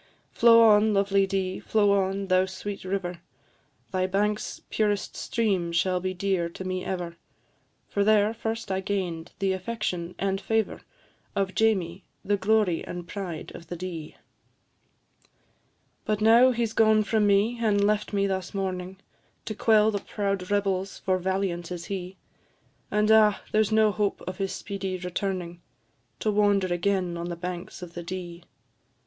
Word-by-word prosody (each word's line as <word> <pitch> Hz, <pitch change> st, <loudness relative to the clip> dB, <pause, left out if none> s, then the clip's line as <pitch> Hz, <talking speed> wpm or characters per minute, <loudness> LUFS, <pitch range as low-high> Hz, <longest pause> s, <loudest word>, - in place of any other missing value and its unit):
Flow 230 Hz, 0 st, +6 dB
on, 215 Hz, -1 st, +5 dB
lovely 195 Hz, 0 st, +3 dB
Dee, 190 Hz, -1 st, -2 dB
flow 205 Hz, -2 st, +2 dB
on, 195 Hz, 0 st, +1 dB
thou 185 Hz, 0 st, +3 dB
sweet 200 Hz, +1 st, -6 dB
river, 185 Hz, -2 st, -3 dB, 0.7 s
Thy 185 Hz, -1 st, 0 dB
banks' 210 Hz, +2 st, -1 dB
purest 205 Hz, -2 st, 0 dB
stream 195 Hz, -7 st, 0 dB
shall 180 Hz, +2 st, +1 dB
be 185 Hz, +1 st, -2 dB
dear 185 Hz, -2 st, -1 dB
to 180 Hz, -, -8 dB
me 185 Hz, 0 st, -3 dB
ever, 175 Hz, -3 st, -4 dB, 0.7 s
For 200 Hz, -, 0 dB
there 215 Hz, +1 st, +4 dB
first 225 Hz, -2 st, -4 dB
I 190 Hz, -, 0 dB
gain'd 185 Hz, -4 st, -3 dB
the 195 Hz, -1 st, +1 dB
affection 185 Hz, -3 st, -3 dB
and 195 Hz, 0 st, -1 dB
favour 220 Hz, -1 st, -1 dB, 0.5 s
Of 195 Hz, -1 st, 0 dB
Jamie, 190 Hz, -4 st, +1 dB, 0.2 s
the 205 Hz, -, +2 dB
glory 200 Hz, -3 st, +2 dB
and 175 Hz, -1 st, -7 dB
pride 180 Hz, -5 st, -6 dB
of 170 Hz, -, -11 dB
the 175 Hz, -, -5 dB
Dee. 170 Hz, -3 st, -6 dB, 1.9 s
But 215 Hz, -1 st, -1 dB
now 230 Hz, +4 st, +6 dB
he 240 Hz, -2 st, +1 dB
's 220 Hz, -, -5 dB
gone 220 Hz, -1 st, +4 dB
from 210 Hz, 0 st, +2 dB
me, 205 Hz, +4 st, +2 dB
and 205 Hz, -3 st, +2 dB
left 210 Hz, 0 st, +1 dB
me 200 Hz, -1 st, +1 dB
thus 190 Hz, -1 st, -3 dB
mourning, 190 Hz, -1 st, -3 dB, 0.5 s
To 215 Hz, -, -3 dB
quell 215 Hz, 0 st, +4 dB
the 205 Hz, -, -1 dB
proud 195 Hz, -3 st, -3 dB
rebels 195 Hz, -1 st, 0 dB
for 185 Hz, -1 st, 0 dB
valiant 185 Hz, -2 st, -2 dB
is 175 Hz, -1 st, -5 dB
he; 185 Hz, 0 st, -6 dB, 0.7 s
And, 210 Hz, +1 st, +2 dB
ah! 215 Hz, -2 st, +5 dB
there's 215 Hz, -1 st, +2 dB
no 215 Hz, -1 st, +4 dB
hope 200 Hz, +1 st, -1 dB
of 185 Hz, 0 st, -6 dB
his 195 Hz, -1 st, -1 dB
speedy 195 Hz, -2 st, -4 dB
returning, 180 Hz, -1 st, -4 dB, 0.6 s
To 215 Hz, -, +1 dB
wander 200 Hz, -3 st, +2 dB
again 180 Hz, -1 st, 0 dB
on 170 Hz, +1 st, -4 dB
the 175 Hz, -, -3 dB
banks 180 Hz, +1 st, -6 dB
of 170 Hz, -1 st, -9 dB
the 175 Hz, -, -6 dB
Dee. 175 Hz, -1 st, -7 dB
195 Hz, 155 wpm, -26 LUFS, 180-210 Hz, 1.9 s, Flow